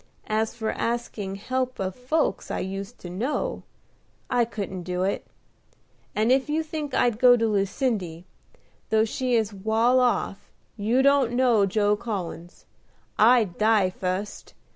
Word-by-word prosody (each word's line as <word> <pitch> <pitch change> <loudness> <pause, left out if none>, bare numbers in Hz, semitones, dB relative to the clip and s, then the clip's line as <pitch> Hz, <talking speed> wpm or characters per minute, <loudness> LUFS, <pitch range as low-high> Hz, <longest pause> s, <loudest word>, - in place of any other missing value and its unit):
As 220 +1 -1
for 220 -2 -2
asking 230 -4 -3
help 255 +5 -2
of 190 -1 -2
folks 255 -3 -1
I - - -2
used 195 +4 -5
to 175 - -7
know, 230 +11 -2 0.7
I 245 -1 +3
couldn't 200 -5 -5
do 180 +1 -2
it; 195 - -2 0.9
and 220 +3 +2
if 265 +2 +2
you 315 +2 0
think 305 -3 -5
I'd 240 -3 +2
go 245 -1 +7
to 230 - +1
Lucindy, 200 - -1 0.7
though 220 0 +3
she 250 +2 -1
is 220 -2 +1
wal 220 +5 +2
off, 245 -5 0 0.2
you 230 +6 +1
don't 275 -4 +4
know 240 -5 +3
Joe 205 +1 +2
Collins. 180 -6 -6 0.5
I'd 220 -5 +4
die 215 -3 +3
fust! 185 +3 -4
220 Hz, 140 wpm, -25 LUFS, 195-250 Hz, 0.9 s, go